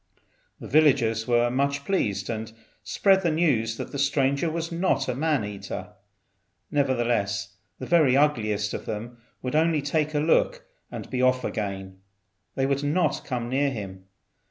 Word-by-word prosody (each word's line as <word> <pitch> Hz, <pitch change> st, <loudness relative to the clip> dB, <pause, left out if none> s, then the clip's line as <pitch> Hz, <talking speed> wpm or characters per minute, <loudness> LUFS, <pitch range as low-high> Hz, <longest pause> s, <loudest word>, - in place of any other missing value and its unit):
The -, -, -8 dB
villagers 125 Hz, -7 st, +3 dB
were 120 Hz, 0 st, +3 dB
much 140 Hz, +2 st, 0 dB
pleased, 100 Hz, -, 0 dB
and 110 Hz, -1 st, -4 dB, 0.3 s
spread 195 Hz, -1 st, +3 dB
the 175 Hz, -, +1 dB
news 130 Hz, -9 st, +1 dB
that -, -, -6 dB
the 140 Hz, -, -4 dB
stranger 140 Hz, +2 st, +1 dB
was 165 Hz, +1 st, -3 dB
not 170 Hz, -6 st, 0 dB
a 125 Hz, -, 0 dB
man 145 Hz, -3 st, 0 dB
eater. 100 Hz, 0 st, -7 dB, 0.8 s
Nevertheless, 120 Hz, -8 st, 0 dB, 0.2 s
the -, -, -6 dB
very 150 Hz, -7 st, +4 dB
ugliest 110 Hz, -8 st, +1 dB
of -, -, -6 dB
all 110 Hz, +3 st, -4 dB, 0.3 s
would 125 Hz, +2 st, -2 dB
only 160 Hz, -2 st, +2 dB
take 150 Hz, +1 st, 0 dB
a -, -, +3 dB
look -, -, +2 dB, 0.3 s
and -, -, -6 dB
be 130 Hz, -1 st, -1 dB
off 130 Hz, 0 st, +3 dB
again; 95 Hz, -2 st, -4 dB, 0.6 s
they 135 Hz, -, +1 dB
would 140 Hz, +1 st, 0 dB
not 155 Hz, +5 st, +1 dB
come 125 Hz, -3 st, -3 dB
near 140 Hz, +3 st, +1 dB
him. 95 Hz, -6 st, -7 dB
130 Hz, 155 wpm, -25 LUFS, 110-150 Hz, 0.8 s, very